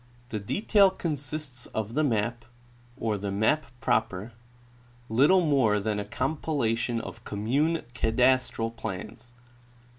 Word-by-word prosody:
The 110 - -3
detail 200 - +3
consists 150 -6 -4
of 110 0 -2
the 155 +4 +2
map, 120 -2 0 0.5
or 110 -3 -1
the 100 0 -3
map 110 +10 +1
proper, 105 -1 0 0.8
httle 155 +9 +5
more 120 -8 +3
than 105 0 -1
a 100 - -3
compilation 130 -2 -1
of - - -8
commune 140 +11 0
cadastral 125 -1 +2
plans. 115 +4 -7
120 Hz, 115 wpm, -27 LUFS, 110-145 Hz, 0.8 s, httle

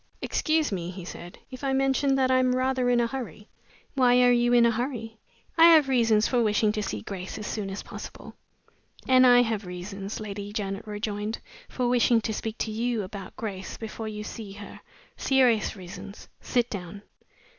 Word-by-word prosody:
"Excuse 310 -3 0
me," 175 -3 -3
he 180 -1 -8
said, 175 0 -9
"if 255 +1 -9
I 270 -1 0
mention 270 +1 +2
that 260 -1 +2
I 255 - +4
am 255 0 +2
rather 255 -1 +1
in 245 -1 +3
a 235 - +3
hurry." 230 - -6 0.4
"Why 250 -2 +4
are 245 - +6
you 240 0 +3
in 240 -1 +6
a 235 - +4
hurry?" 230 -2 -4 0.4
"I 330 - +9
have 305 -3 +4
reasons 225 -5 +3
for 245 -2 +1
wishing 210 -1 +2
to 215 0 -2
see 195 - -4
Grace 185 -2 -6
as 210 - -6
soon 205 -2 -3
as 195 +1 -6
possible." - - -9 0.7
"And 255 0 +6
I 245 0 +7
have 220 -4 -3
reasons," 195 +3 -6
Lady 205 -1 -6
Janet 200 -1 -4
rejoined, 210 +1 -3 0.3
"for 250 -1 -1
wishing 240 -1 +4
to 220 - -2
speak 220 +1 -4
to 220 - -2
you 230 0 -1
about 190 0 -8
Grace 195 -4 -6
before 225 0 -6
you 210 -1 -5
see 210 -2 -8
her; 205 0 -10 0.4
serious 250 -6 +2
reasons. 190 +2 -10
Sit 245 -1 0
down." 200 0 -7
225 Hz, 190 wpm, -26 LUFS, 205-250 Hz, 0.7 s, I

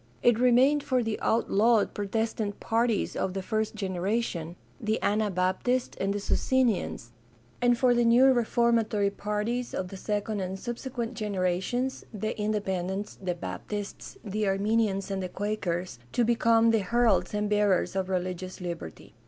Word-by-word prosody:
It 240 -2 +4
remained 255 +4 +4
for 255 -3 +1
the 225 -1 -2
outlawed 225 0 +2
Protestant 210 0 -2
parties 230 -1 0
of 190 0 -2
the 195 - -3
first 215 +2 -1
generation— 185 -3 -2 0.2
the 220 -2 0
Anabaptists 205 +4 0
and 195 - +1
the 205 - -1
Socinians 225 - 0 0.3
— 120 - -32
and 245 -1 +4
for 250 0 +4
the 240 0 +3
new 235 +3 +6
reformatory 230 -3 +2
parties 210 +5 -2
of 185 -1 -3
the 195 - -8
second 210 +1 -2
and 190 0 -3
subsequent 240 +1 -4
generations 210 +4 -1
— - - -29
the 215 - -1
Independents, 200 -2 -2
the 180 -2 -2
Baptists, 185 - -6
the 210 +1 -1
Arminians, 200 0 +1
and 195 -1 -2
the 185 - -4
Quakers 185 - -3
— 120 - -28
to 240 - +3
become 230 0 +4
the 225 - +3
heralds 205 -3 +2
and 210 0 0
bearers 205 -3 +2
of 190 -1 -1
religious 185 0 -3
liberty. 170 - -7
210 Hz, 155 wpm, -28 LUFS, 190-230 Hz, 0.3 s, new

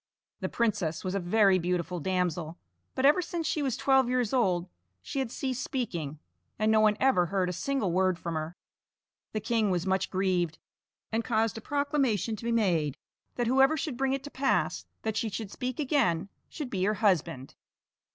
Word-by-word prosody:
The - - -2
princess 205 -9 0
was 185 - -2
a 195 - 0
very 195 +1 +4
beautiful 180 0 -1
damsel, 175 -2 -1 0.4
but 260 - +1
ever 295 +6 +6
since 340 -1 -3
she 305 - 0
was 265 -4 -1
twelve 265 -2 +3
years 250 -3 0
old 185 -9 +2 0.4
she 275 - -3
had 265 -3 -1
ceased 260 +1 -3
speaking, 170 - -3 0.4
and 215 +1 +2
no 220 - +5
one 215 -1 +4
ever 220 -10 +3
heard 185 0 0
a - - -2
single 215 +1 -1
word 185 0 +2
from 170 0 -4
her. 160 +2 -4 0.8
The 215 - 0
king 220 -1 +1
was 180 -1 0
much 190 0 0
grieved, 180 -4 0 0.5
and 225 +1 0
caused 225 -1 +1
a - - -14
proclamation 275 -6 0
to 205 - -11
be 235 - 0
made 170 - +1 0.4
that 240 - 0
whoever 270 +5 +4
should 290 -2 -3
bring 265 +1 0
it 270 0 -2
to 290 - -8
pass 270 0 0 0.2
that 220 -1 -1
she 230 - 0
should 210 -1 -5
speak 255 +1 -4
again, 250 - +1 0.2
should 295 -6 -6
be 185 -2 -1
her 210 +1 +1
husband. 180 - 0
215 Hz, 190 wpm, -29 LUFS, 180-260 Hz, 0.8 s, ever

